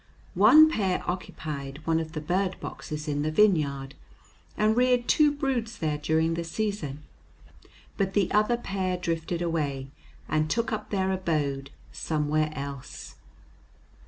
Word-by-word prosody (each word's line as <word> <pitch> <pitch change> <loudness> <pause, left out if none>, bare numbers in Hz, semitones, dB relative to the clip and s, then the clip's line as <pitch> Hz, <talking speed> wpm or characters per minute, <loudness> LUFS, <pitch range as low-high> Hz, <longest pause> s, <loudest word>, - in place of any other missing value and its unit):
One 245 - +8
pair 195 - 0
occupied 150 -5 -5
one 165 0 +2
of 160 0 -5
the 155 - -4
bird 185 +4 -1
boxes 150 +1 -6
in 145 -1 -1
the 155 - 0
vineyard 150 -8 +2 0.6
and 215 +1 +3
reared 250 0 +3
two 300 -1 +5
broods 260 -6 -2
there 150 -2 -1
during 160 +2 +1
the 170 +1 -2
season, 165 -6 -3 0.9
but 195 -1 0
the 195 -3 +2
other 215 +3 +3
pair 190 -5 -2
drifted 170 0 -2
away 140 -5 -2 0.4
and 155 0 0
took 230 +4 0
up 210 -1 -4
their 190 -2 0
abode 150 -7 -1 0.2
somewhere 155 0 0
else. 140 -1 -7
165 Hz, 135 wpm, -27 LUFS, 150-205 Hz, 0.9 s, One